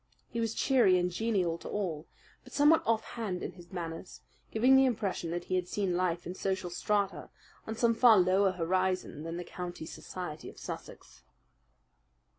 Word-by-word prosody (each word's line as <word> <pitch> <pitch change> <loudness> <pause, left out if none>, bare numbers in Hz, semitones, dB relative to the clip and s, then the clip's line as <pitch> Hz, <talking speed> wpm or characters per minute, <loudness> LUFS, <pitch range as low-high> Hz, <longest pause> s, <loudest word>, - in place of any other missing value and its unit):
He 235 - -3
was 225 -1 -1
cheery 240 -9 +4
and 180 0 0
genial 180 -5 0
to - - -8
all, 175 -7 -3 0.4
but - - -15
somewhat 295 +3 +5
offhand 220 -4 -1
in - - -3
his 175 -2 -15
manners, 165 -8 -6 0.3
giving 250 +4 +4
the 265 0 +6
impression 200 -8 -1
that 175 +1 -3
he 185 - -5
had 180 -1 0
seen 190 -2 -1
life 175 -1 0
in 180 - -4
social 190 -1 -2
strata 200 +2 -1 0.4
on 220 - -3
some 230 0 +3
far 230 -1 +7
lower 185 +1 +4
horizon 185 -1 -1
than 165 +2 -5
the 175 - -4
county 175 -2 -6
society 165 -1 -7
of - - -15
Sussex. - - -9
185 Hz, 170 wpm, -31 LUFS, 175-220 Hz, 0.4 s, far